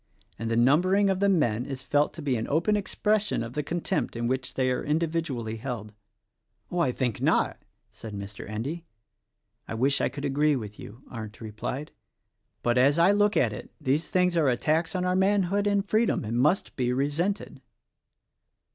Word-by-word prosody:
And 115 - -3
the 115 - +1
numbering 185 +11 +4
of 190 - -1
the 200 0 +3
men 125 - +2
is 135 -1 -5
felt 145 +1 +2
to 160 - -7
be 135 -3 +1
an 115 -1 -2
open 170 +8 +2
expression 210 - 0
of 115 +1 -7
the 150 - -1
contempt 165 -2 -2
in 120 0 -2
which 130 +1 -2
they 130 -1 +1
are 125 - -1
individually 150 -8 -1
held." 110 -3 -5 0.8
"Oh, 175 - -1
I 140 -7 +3
think 125 -3 -2
not!" - - +2 0.3
said 110 -2 -9
Mr. 100 0 -7
Endy. 135 +11 -4 0.8
"I - - -4
wish 135 +4 +2
I - - +2
could 140 0 -6
agree 145 +2 +2
with 105 -4 -6
you," 115 +7 -11
Arndt 110 -3 -7
replied, 115 +7 -5 0.7
"but 120 +1 +2
as 140 +4 +4
I 170 +4 +6
look 205 +1 +3
at 110 -3 +2
it - - -9
these 140 +5 0
things 180 -1 +2
are 155 -5 +3
attacks 160 +7 +1
on 180 0 0
our 180 0 +1
manhood 200 +1 +2
and 200 0 +1
freedom, 220 +3 +2
and 115 +3 -1
must 150 +9 +2
be 125 -2 0
resented." 150 +10 -1
145 Hz, 180 wpm, -27 LUFS, 120-180 Hz, 0.8 s, I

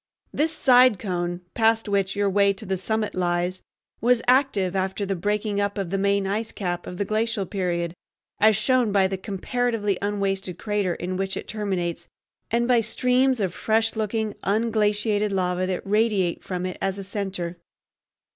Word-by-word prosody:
This 310 +2 +1
side 250 -6 +5
cone, 175 -2 -3
past 225 -1 +2
which 200 -1 0
your 205 0 +1
way 200 0 +3
to 195 +2 -9
the 190 -1 -1
summit 215 +3 -2
lies, 180 0 -1 0.4
was 245 0 +3
active 245 -8 +3
after 190 +2 -1
the 195 0 -1
breaking 205 +2 -1
up 200 0 -1
of 190 -4 -3
the 195 - 0
main 200 0 +2
ice 215 +3 -2
cap 175 -3 -4
of 180 - -6
the 200 - -1
glacial 215 -1 0
period, 175 -3 -2 0.5
as 215 0 +5
shown 240 +1 +2
by 195 -1 +4
the 190 - -3
comparatively 210 +1 -1
unwasted 195 -3 -1
crater 205 -5 -1
in 180 +1 -4
which 195 0 -2
it - - -6
terminates 185 -5 -3 0.4
and 235 +1 +1
by 245 -2 +4
streams 250 +3 +2
of 190 -4 -1
fresh 225 +2 +1
looking, 220 0 -1
unglaciated 210 -1 +1
lava 185 -1 0
that 185 -1 -3
radiate 205 -4 +1
from 180 -1 -3
it 185 - -5
as 195 0 -1
a 195 - -5
center. 190 -3 -4
200 Hz, 170 wpm, -24 LUFS, 185-220 Hz, 0.5 s, side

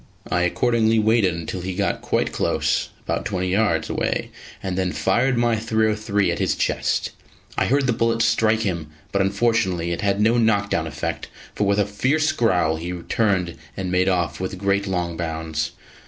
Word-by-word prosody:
I 90 - +2
accordingly 115 +4 +2
waited 110 -4 +3
until 85 +2 -5
he 95 0 -4
got 100 +1 -1
quite - - 0
close - - 0
about - - -2
twenty 95 -3 -2
yards 95 -5 +1
away - - -2 0.3
and 95 -2 -2
then 95 -1 0
fired 125 +1 +1
my 120 -1 +2
.303 110 -2 +1
at - - -3
his - - +1
chest. - - 0 0.4
I - - +1
heard 140 +1 +2
the 125 - +2
bullet 115 0 +1
strike 110 -1 +2
him, 85 -7 -2 0.2
but 100 - +1
unfortunately 95 -4 +1
it 85 - -2
had 100 -1 +1
no 115 +3 +3
knockdown 100 -7 +1
effect, 80 +2 -4 0.3
for 105 - 0
with 100 0 +2
a 105 - +3
fierce 140 +10 +1
growl 90 -8 +2
he 85 +2 -5 0.2
turned 95 -6 +1 0.2
and 95 -1 -3
made 90 +1 +3
off 85 -3 0
with 95 +1 -4
great 100 +1 0
long 90 -3 -2
bounds. 80 -2 -2
100 Hz, 175 wpm, -22 LUFS, 90-110 Hz, 0.4 s, waited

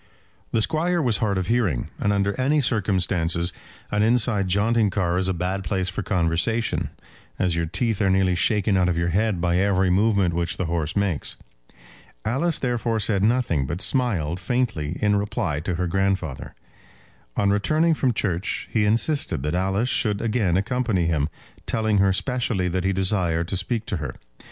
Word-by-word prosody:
The 110 - +2
Squire 170 +5 0
was 120 -8 +2
hard 100 -3 0
of 95 - -1
hearing, 100 - 0
and 105 - +1
under 100 0 +1
any 145 +4 +2
circumstances 90 - 0 0.4
an 105 - +1
inside 110 -3 +2
jaunting 105 +3 +2
car 90 -2 0
is 95 0 +1
a - - +2
bad 90 +2 -2
place 95 +2 -1
for 95 - -4
conversation, 90 +5 0 0.5
as 90 -2 0
your 85 -1 -1
teeth 105 +5 -1
are 100 - +3
nearly 95 -1 +3
shaken 100 +3 +2
out 90 -1 +3
of 85 - -1
your 85 0 0
head 100 +1 +1
by 85 0 +1
every 95 -1 +2
movement 100 -2 +2
which 85 0 -1
the 95 - -1
horse 80 -2 -2
makes. 100 -7 0 0.9
Alice 140 +9 +1
therefore 120 -2 -1
said 100 -1 +1
nothing, 105 - +1
but 85 - -3
smiled 95 - 0
faintly, 95 -7 -1
in 105 -1 +3
reply 90 -7 -2
to 85 +3 -3
her 90 +1 -1
grandfather. 95 -5 -2 0.8
On 100 -1 +2
returning 155 +11 +2
from 135 -4 +1
church 95 -4 -2
he 110 -2 +2
insisted 115 - +1
that 75 +1 -1
Alice 95 +6 0
should 105 -5 0
again 105 -6 +1
accompany 105 -3 0
him, 80 -3 0 0.4
telling 110 -2 +1
her 95 0 +4
specially 120 -3 -1
that 90 +1 -2
he 95 - +2
desired 90 -4 0
to - - -1
speak 110 +4 -2
to 100 - -2
her. 75 -4 -5
95 Hz, 175 wpm, -23 LUFS, 90-110 Hz, 0.9 s, her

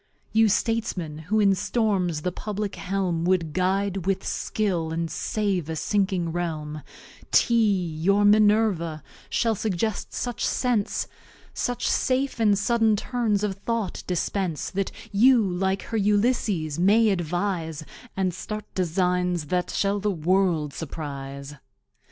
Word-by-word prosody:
You 220 0 +5
statesmen, 195 -8 -1
who 215 +2 +2
in 200 -2 +5
Storms 195 -5 0
the 180 - 0
Publick 210 +2 -4
Helm 185 -3 -1
Wou'd 170 -4 +1
Guide 190 0 0
with 195 -1 0
Skill, 180 -7 -1
and 165 0 -2
Save 195 -5 -1
a 160 - -2
sinking 190 -1 0
Realm, 155 -3 -3 0.5
TEA, 215 -6 +3 0.2
your 200 +4 +3
Minerva, 205 -7 +3 0.3
shall 230 -1 +1
suggest 215 0 -2
such 245 -1 -3
Sense, 240 -5 0 0.5
Such 245 0 -2
safe 260 0 0
and 210 -3 +4
sudden 225 +1 +2
Turns 215 -2 0
of 200 -2 -1
Thought 225 -1 -3
dispense, 180 -2 -2
That 195 0 -2 0.2
you, 240 +5 +6
like 190 +2 -1
her 225 - -3
Ulysses, 205 - +1
may 210 +4 +5
Advise, 175 -3 -2 0.3
And 185 -2 +1
start 215 +4 -6
Designs 180 -1 0
that 180 0 0
shall 200 0 0
the 210 +1 0
World 175 -4 +1
surprise. 140 -3 -6
195 Hz, 125 wpm, -25 LUFS, 170-210 Hz, 0.5 s, you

